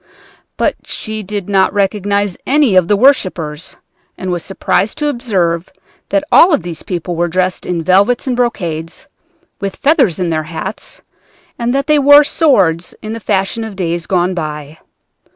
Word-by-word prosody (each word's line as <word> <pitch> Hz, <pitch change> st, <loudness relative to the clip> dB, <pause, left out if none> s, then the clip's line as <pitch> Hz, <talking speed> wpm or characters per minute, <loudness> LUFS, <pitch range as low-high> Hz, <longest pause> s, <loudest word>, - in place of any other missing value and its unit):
But -, -, 0 dB
she 215 Hz, -1 st, -4 dB
did 205 Hz, -1 st, -5 dB
not 195 Hz, 0 st, +2 dB
recognize 200 Hz, -1 st, 0 dB
any 280 Hz, -7 st, +3 dB
of 185 Hz, -2 st, +4 dB
the 205 Hz, -, +2 dB
worshipers 185 Hz, -, +1 dB, 0.4 s
and 185 Hz, -1 st, -4 dB
was 175 Hz, -2 st, -3 dB
surprised 195 Hz, +1 st, -1 dB
to 295 Hz, -1 st, 0 dB
observe 185 Hz, -, -1 dB, 0.4 s
that 295 Hz, -, +1 dB
all 355 Hz, -, +7 dB
of 300 Hz, -, +1 dB
these 170 Hz, -2 st, -6 dB
people 175 Hz, -1 st, -4 dB
were 175 Hz, +1 st, 0 dB
dressed 185 Hz, +1 st, -1 dB
in 170 Hz, -2 st, -2 dB
velvets 200 Hz, +7 st, +2 dB
and 255 Hz, -2 st, -1 dB
brocades, 170 Hz, -9 st, -3 dB, 0.5 s
with 195 Hz, -1 st, -4 dB
feathers 275 Hz, -, +2 dB
in 175 Hz, -2 st, -1 dB
their 155 Hz, -1 st, 0 dB
hats, 170 Hz, +5 st, -7 dB, 0.6 s
and 235 Hz, 0 st, 0 dB
that 275 Hz, -, 0 dB
they 300 Hz, -1 st, +3 dB
wore 285 Hz, +1 st, +7 dB
swords 195 Hz, -, +1 dB
in 215 Hz, +1 st, -5 dB
the 230 Hz, -, -5 dB
fashion 205 Hz, +2 st, -1 dB
of 220 Hz, -3 st, -7 dB
days 170 Hz, -2 st, -3 dB
gone 185 Hz, 0 st, +1 dB
by. 150 Hz, -2 st, -6 dB
195 Hz, 165 wpm, -15 LUFS, 175-235 Hz, 0.6 s, all